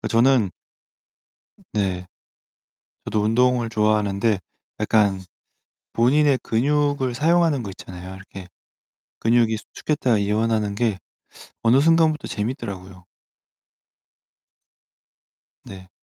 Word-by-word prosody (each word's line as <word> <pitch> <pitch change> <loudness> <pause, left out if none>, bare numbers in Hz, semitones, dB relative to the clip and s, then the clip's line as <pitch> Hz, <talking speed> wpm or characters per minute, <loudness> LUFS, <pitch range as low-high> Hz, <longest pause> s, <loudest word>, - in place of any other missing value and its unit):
그 - - -4
저는 115 -4 +3 1.1
으 - - -22
네. 95 -3 -2 1.0
저도 105 - -1
운동을 120 +2 +2
좋아하는데 105 -1 +1 0.4
약간 105 -3 +2 0.7
본인의 135 +3 +3
근육을 140 +1 0
사용하는 160 -1 +2
거 100 - -6
있잖아요. 95 -1 -10
이렇게 95 -1 -11 0.7
근육이 115 -1 +2
수축했다가 125 +1 -1
이완하는 105 0 0
게 110 -3 0 0.6
어느 115 +4 +4
순간부터 160 0 +3
재밌더라고요. 100 -5 -6 2.6
네. 95 -1 -11
110 Hz, 230 characters per minute, -22 LUFS, 100-130 Hz, 2.6 s, 어느